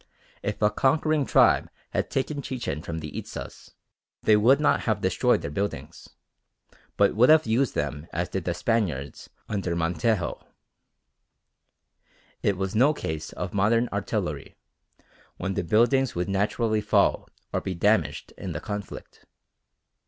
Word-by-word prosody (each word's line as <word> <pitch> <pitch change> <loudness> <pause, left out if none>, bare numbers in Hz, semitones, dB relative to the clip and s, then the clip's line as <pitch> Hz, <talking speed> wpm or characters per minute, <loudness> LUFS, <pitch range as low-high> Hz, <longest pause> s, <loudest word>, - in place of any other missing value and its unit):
If - - -3
a 105 - +4
conquering 150 +5 +1
tribe - - +4 0.2
had - - -1
taken 140 +2 -2
Chichen 120 - -4
from 80 0 -5
the 75 -1 -7
Itzas - - -8 0.5
they 110 - +5
would 120 +7 +5
not 150 - +3
have - - +1
destroyed - - +2
their 70 - -4
buildings, 100 +6 -4 0.9
but 100 -1 +3
would 120 +5 +5
have 155 0 +6
used 115 +3 +1
them 75 +2 -3
as 85 +2 -2
did 90 0 -4
the 85 - -1
Spaniards 85 - -2 0.2
under 95 -5 -2
Montejo. 85 +3 -1 2.0
It 100 -2 +1
was 95 0 -2
no 135 +7 +4
case 80 - -5
of 90 0 -5
modern 115 +4 +2
artillery, - - -3 0.8
when 95 +2 -3
the 90 - -1
buildings 120 +9 +2
would 90 0 -1
naturally 105 +3 0
fall - - +2 0.2
or - - 0
be 95 - -4
damaged 105 +5 +1
in - - -5
the - - -4
conflict. 105 -1 -8
105 Hz, 140 wpm, -26 LUFS, 85-120 Hz, 2.0 s, have